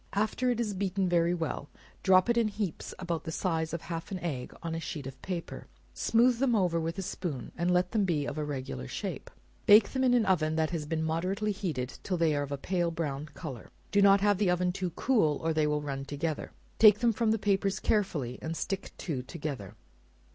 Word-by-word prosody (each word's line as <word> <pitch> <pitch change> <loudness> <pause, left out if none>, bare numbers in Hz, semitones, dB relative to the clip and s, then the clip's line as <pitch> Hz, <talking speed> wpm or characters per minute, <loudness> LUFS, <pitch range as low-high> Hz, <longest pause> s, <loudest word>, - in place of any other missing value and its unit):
After 215 +5 +1
it 240 -2 0
is 215 -3 -1
beaten 190 0 0
very 175 0 +2
well, 160 -3 -3 0.3
drop 185 -1 +5
it 235 - +3
in 230 -2 +3
heaps 205 -4 -4
about 175 -3 -3
the 160 - -5
size 160 -2 -1
of 170 - -3
half 165 -1 -5
an 190 - -3
egg 140 -7 -3
on 165 -1 -3
a 165 - -2
sheet 150 -3 -5
of 130 0 -8
paper; 175 -3 -5 0.3
smooth 235 +1 +3
them 255 -3 +3
over 180 -5 +2
with 165 +2 -3
a 195 - -2
spoon, 170 - -4
and 175 +1 0
let 180 0 +2
them 220 -3 +2
be 160 -6 0
of - - -4
a - - -1
regular 130 - -4
shape; - - -5 0.4
bake 205 0 +8
them 260 -1 0
in 250 -1 +4
an 235 -3 +3
oven 160 -4 +2
that 160 -1 +1
has 155 -4 -3
been 160 0 -1
moderately 185 +6 -1
heated, 160 -11 -4
till 185 - -2
they 165 -3 +2
are 145 - 0
of 145 0 -4
a 140 - -1
pale 175 +3 0
brown 150 -3 -3
color; 135 -9 -7 0.2
do 205 - +4
not 200 0 +6
have 205 -1 +3
the 205 -3 +3
oven 180 0 +2
too 185 0 -2
cool, 185 - +2
or 165 0 +1
they 155 -1 +2
will 150 0 0
run 135 -2 -3
together; 145 +2 -3 0.3
take 210 -2 +8
them 235 +1 +2
from 225 +1 +1
the 220 - +3
papers 195 -1 +1
carefully, 150 - 0
and 160 +1 -4
stick 195 -1 -3
two 145 -8 -3
together. 140 - -6
175 Hz, 225 wpm, -30 LUFS, 155-200 Hz, 0.4 s, bake